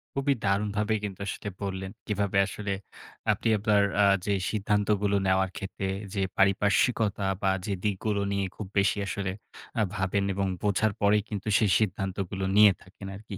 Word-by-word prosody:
খুবই 140 0 +2
দারুণভাবেই 105 +2 +1
কিন্তু 100 -3 -5
আসলে 105 - -4
বললেন। 95 -1 -4 0.2
কিভাবে 100 -1 0
আসলে 100 0 -3 0.6
আপনি - - -1
আপনার 105 0 +3
অ্যা 100 -1 +5 0.2
যে 100 - +1 0.2
সিদ্ধান্তগুলো 105 -1 +1
নেওয়ার 95 0 +2
ক্ষেত্রে 95 0 -4 0.3
যে, 100 - -1 0.2
পারিপার্শ্বিকতা 100 +2 +2 0.2
বা 95 -1 +3
যে 100 - -1
দিকগুলো 105 0 0
নিয়ে 100 -1 0
খুব 105 - -6
বেশি 100 - +2
আসলে 95 -1 -2 0.4
অ্যা 110 - +2
ভাবেন 95 0 0
এবং 100 0 0
বোঝার 105 +1 +2
পরেই 105 0 +4
কিন্তু 105 -1 -5
সেই 105 -4 +2
সিদ্ধান্তগুলো 95 -1 -2
নিয়ে 105 -2 +8
থাকেন 95 +1 -11
আরকি। 105 -1 -8
100 Hz, 155 wpm, -28 LUFS, 95-105 Hz, 0.6 s, নিয়ে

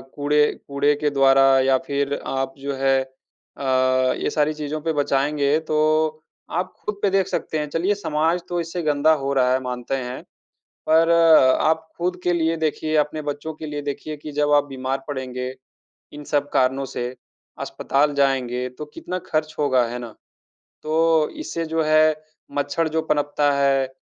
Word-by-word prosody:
कूड़े 150 +1 +3 0.2
कूड़े 140 +1 +2
के 150 - +2
द्वारा 135 -1 +4 0.2
या 130 0 +3
फ़िर 140 0 -1
आप 135 0 -2
जो 140 +1 -4
है 135 0 +2
अ, 130 +1 -15 0.6
ये - - -1
सारी 150 +1 +1
चीज़ों 150 0 -5
पे 160 +1 -1
बचाएँगे 145 0 +1
तो 155 0 +2 0.4
आप 185 +1 -2
ख़ुद 210 -1 -5
पे 200 - +3
देख 195 -1 +1
सकते 155 -4 -2
हैं। 150 -1 -3
चलिए 180 +7 0
समाज 165 -2 0
तो 175 0 -1
इससे 170 +2 -4
गंदा 155 0 +3
हो 140 0 0
रहा 130 -2 +3
है 130 - +2
मानते 125 +1 -3
हैं। 125 -1 -5 0.7
पर 165 +1 +4 0.5
आप 160 0 +1
ख़ुद 180 +1 -2
के 175 - +2
लिए 165 -1 +1
देखिए 155 0 -2
अपने 150 +1 0
बच्चों 145 +2 -4
के 155 - -8
लिए 150 -1 -5
देखिए 145 +2 -5
कि 150 +1 -9
जब 145 0 +1
आप 145 -1 +5
बीमार 135 0 -4
पड़ेंगे। 130 -2 -4 0.6
इन 150 0 -9
सब 145 0 0
कारणों 130 +1 +2
से 125 -2 -4 0.5
अस्पताल 145 +1 0
जाएँगे 130 -3 0
तो 150 - -4
कितना 180 +1 -5
ख़र्च 155 0 -1
होगा। 130 -4 +3
है 120 +1 -5
ना? 120 -3 -8 0.7
तो 160 0 +2
इससे 170 - -4
जो 160 0 -1
है 155 0 +4 0.4
मच्छर 145 +3 0
जो 160 +1 0
पनपता 145 -1 +1
है, 135 -1 +2
145 Hz, 170 wpm, -22 LUFS, 135-155 Hz, 0.7 s, आप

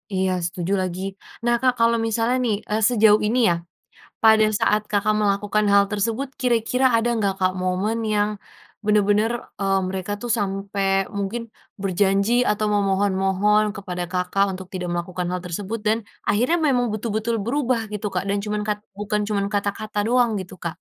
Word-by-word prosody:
Iya 190 0 +1
setuju 175 +2 -2
lagi. 185 0 -3 0.4
Nah 240 - +3
Kak, 255 -1 +3
kalau 230 0 +4
misalnya 230 +3 +1
nih, 220 - +1
eee, 215 +1 0
sejauh 215 -3 +5
ini 245 +3 +1
ya, 170 - +2 0.7
pada 220 -1 +6
saat 210 - +2
Kakak 210 +1 +2
melakukan 205 +1 +1
hal 200 0 +6
tersebut 225 +6 -1
kira-kira 250 +1 +2
ada 230 +1 +1
gak 195 -1 +1
Kak 185 0 +2
moment 195 +5 0
yang 205 0 +2 0.6
benar-benar, 210 +1 +3 0.3
eee, 195 0 +2
mereka 190 +2 -4
tuh 240 - -4
sampai 195 0 -2 0.3
mungkin 210 +4 -2 0.4
berjanji 195 +3 +1 0.2
atau 210 0 0
memohon-mohon 195 +1 +2
kepada 180 -3 -5
Kakak 180 +2 +1
untuk 190 0 -8
tidak 180 -1 -3
melakukan 175 +1 -3
hal 180 - -2
tersebut 200 +6 -4
dan, 220 +2 +3 0.3
akhirnya 250 +11 +2
memang 250 -3 +2
betul-betul 220 +1 -2
berubah 255 0 0
gitu 210 0 -3
Kak, 180 - 0
dan 200 +1 +1
cuman 210 0 -2
kat 210 -1 -1 0.2
bukan 210 0 -1
cuman 200 -2 0
kata-kata 205 +1 -2
doang 245 -1 +3
gitu 180 - -9
Kak? 170 0 -3
205 Hz, 160 wpm, -22 LUFS, 195-225 Hz, 0.7 s, pada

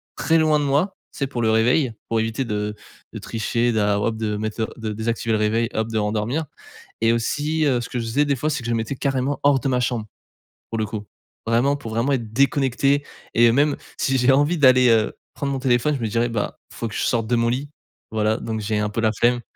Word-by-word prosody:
très 165 0 +2
loin 155 -1 +3
de 145 - -1
moi, 150 +8 +1 0.2
tu - - -11
sais, 140 - 0
pour 125 -3 -4
le 110 - +3
réveil, 120 +4 +3 0.2
pour 115 - +1
éviter 115 +4 -1
de 105 -1 -3 0.4
de - - -6
tricher, 115 +1 -1
d 110 - +1
alors 105 0 +1
hop 110 -1 -1
de 110 -1 -2
mettre 110 +1 -3
le 110 - 0 0.2
de 105 - -3
désactiver 115 +1 -1
le 110 - +3
réveil, 110 +2 +1
hop 110 +1 -1
de 115 - -6
me - - +2
rendormir 110 +9 -1 0.6
et 115 0 +4
aussi, 150 +7 0
heu, 125 -4 +2
ce - - -7
que 125 - -3
je 115 - -3
faisais 135 +6 +1
des 140 -1 +1
fois, 155 +5 -1
c'est 150 - -1
que - - -10
je - - -1
le 115 - +1
mettais 115 +4 -3
carrément 135 +1 -1
hors 145 -1 +4
de 135 - -2
ma 125 -1 +1
chambre, 120 -3 -1 0.7
pour 115 - -3
le 110 - 0
coup. 105 0 -6 0.4
Vraiment, 120 +5 +2
pour 140 -6 -8
vraiment 115 +5 +1
être 115 -5 -2
déconnecté 140 +2 +2 0.3
et 115 0 +5
même 145 +4 +2 0.2
si 135 -1 +1
j'ai 125 +2 +4
envie 145 +6 +2
d'aller, 130 -3 +6
heu, 110 -1 +2 0.2
prendre 140 -1 -2
mon 135 - -1
téléphone 125 +3 +2
je - - -6
me 115 - -1
dirais: 115 +2 +1
«Bah, 110 -3 -3 0.2
faut 115 - -4
que 105 - -9
je - - -1
sorte 115 -2 +1
de 120 - +2
mon 115 0 +2
lit», 135 +4 -3 0.4
voilà, 110 0 +1
donc 110 -1 -4
j'ai 105 0 -1
un 105 - 0
peu 115 - -2
la 110 -1 +3
flemme. 120 +3 +2
120 Hz, 255 wpm, -22 LUFS, 110-140 Hz, 0.7 s, d'aller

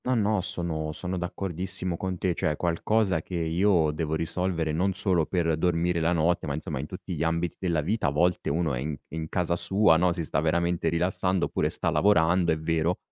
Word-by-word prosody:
No, 130 - +2
no, 105 -3 +2
sono 80 -5 -3
sono 90 +4 -4
d'accordissimo 90 0 -3
con 95 +1 -3
te, 90 0 0
cioè 80 - 0
è - - -2
qualcosa 90 +1 +1
che 90 - -7
io 85 0 +2
devo 80 0 -2
risolvere, 85 0 -1
non 90 +5 +1
solo 90 -5 +1
per 85 -3 +1
dormire 85 0 +1
la 80 +1 +1
notte, 85 0 +1
ma 70 - -2
insomma, 75 -2 -4
in 70 - -4
tutti 90 +1 -7
gli 80 - -4
ambiti 85 +1 -1
della 85 -4 0
vita. 105 +9 0
A - - +3
volte 85 +4 +1
uno 80 -1 0
è - - -2
in 75 +3 -3
è - - -19
in 80 -1 -4
casa 85 -1 0
sua, 85 +1 +3
no, 90 +1 +3
si 85 0 -3
sta 70 - 0
veramente 85 +1 +1
rilassando 90 +2 0
oppure - - -1
sta - - -1
lavorando, 90 -3 +3
è 80 - +1
vero, 80 +2 0
85 Hz, 215 wpm, -27 LUFS, 80-90 Hz, -, A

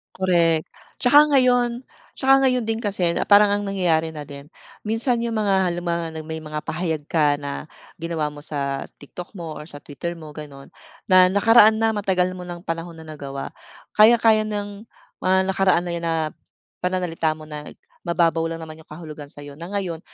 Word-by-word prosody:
Korek, 170 -4 +2 0.4
tsaka 290 +4 +7
ngayon 245 -1 +3 0.3
tsaka 270 0 +4
ngayon 250 -2 +1
din 225 +1 -2
kasi 195 -6 0
na - - -2
parang 205 0 +7
ang 205 - 0
nangyayari 170 -5 +1
na 155 -2 -7
din 140 0 -11 0.4
minsan 230 +3 +1
yung 230 -1 -2
mga 195 -3 +2
halimbawa, 170 -1 -2 0.2
may 160 0 -5
mga 155 -1 -6
pahayag 160 -3 -2
ka 150 -2 +2
na 145 +1 -6 0.3
ginawa 165 -3 -2
mo 145 - -10
sa 140 -2 -3
TikTok 175 +7 -10
mo 165 -3 -6
or 150 0 -9
sa 145 - -10
Twitter 170 +4 -6
mo 155 -2 -10
gano'n, 145 -2 -10 0.4
na 185 0 +8
nakaraan 215 +2 +6
na 225 0 +2
matagal 190 -3 0
mo 185 - -8
ng 175 -1 -8
panahon 165 0 -4
na 160 - -11
nagawa, 140 -3 -7 0.5
kayang 230 +2 +7
kaya 220 -1 +5
ng 205 +1 -5 0.3
mga 185 0 +3 0.2
nakaraan 190 -2 +3
na 175 - -3
yun 170 0 -4
na 165 - +1 0.7
pananalita 180 -3 -1
mo 155 - -11
na 150 -1 -8 0.4
mababaw 165 -1 +2
lang 165 0 -6
naman 155 0 -10
yung 160 - -17
kahulugan 155 -2 -9
sa 145 0 -11
'yo, 145 +1 -11
na 170 - -7
ngayon 185 -4 -3
170 Hz, 180 wpm, -22 LUFS, 155-205 Hz, 0.7 s, na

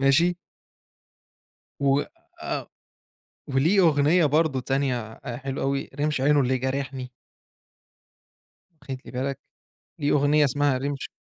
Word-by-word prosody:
ماشي؟ 155 +6 +4 1.5
و 140 0 +3 0.4
آه، - - -4 0.8
وليه 150 +9 +3
أغنية 160 0 +4
برضه 150 -2 +2
تانية 125 -4 -2 0.2
حلوة 135 +2 -4
أوي 135 0 -1
رمش 150 -2 0
عينه 145 +1 +4
اللي 130 0 +1
جارحني. 130 0 -3 1.7
واخد 135 -1 -5
لي - - -10
بالك؟ 135 +2 -2 0.6
ليه 145 - +1
أغنية 145 +1 +4
اسمها 140 0 +1
رمش 140 +1 -3
140 Hz, 105 wpm, -25 LUFS, 130-145 Hz, 1.7 s, ماشي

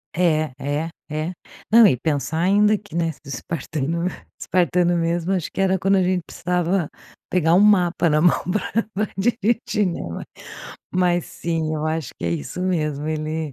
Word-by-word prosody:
É. 155 -5 +1
É. 145 +4 -2 0.2
É. 155 +3 -2 0.4
Não, 230 0 +8
e 130 - +2
pensar 145 +2 -1
ainda 205 +4 +4
que, 205 -4 -13
né, 165 -1 +1 0.2
espartano 160 +4 -3 0.3
espartano 175 -1 +2
mesmo, 170 +2 0
acho 180 -4 -1
que - - -7
era 190 0 +3
quando 195 +2 +3
a 185 - +3
gente 180 0 +1
precisava 180 -1 -1 0.4
pegar 165 -2 +3
um 185 - +6
mapa 180 -5 +4
na 150 +1 +3
mão 175 - +4
pra 215 0 -1
dirigir, 215 -1 +1
né? - - -5
Mas 85 - -6 0.7
mas 175 -1 +2
sim, 165 -2 -2
eu 155 0 -3
acho 155 -4 -2
que - - -6
é 85 - 0
isso 85 - -4
mesmo, 150 -5 -1
ele 155 -1 -3
170 Hz, 165 wpm, -22 LUFS, 155-185 Hz, 0.7 s, Não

